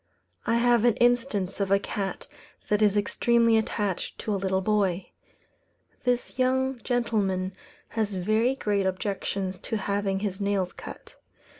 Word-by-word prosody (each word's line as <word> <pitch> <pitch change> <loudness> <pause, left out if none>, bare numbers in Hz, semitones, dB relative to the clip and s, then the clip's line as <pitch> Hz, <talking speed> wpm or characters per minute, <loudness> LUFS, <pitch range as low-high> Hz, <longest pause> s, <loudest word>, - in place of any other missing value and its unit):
I 230 - +3
have 240 -1 +4
an 240 -3 +4
instance 240 -6 +1
of 200 -1 0
a 195 - +5
cat 195 -1 -4 0.4
that 210 0 +2
is 210 -1 +4
extremely 230 +2 +3
attached 210 -4 -1
to 215 - -2
a - - +1
little 190 -1 0
boy. 195 -3 0 0.9
This 245 +1 -1
young 260 0 +1
gentleman 200 -6 0 0.4
has 215 -3 -1
very 215 +7 +2
great 205 -6 0
objections 190 0 -2
to 225 - -3
having 200 -1 -1
his 200 -1 -3
nails 200 -2 0
cut. - - -11
205 Hz, 140 wpm, -27 LUFS, 195-235 Hz, 0.9 s, a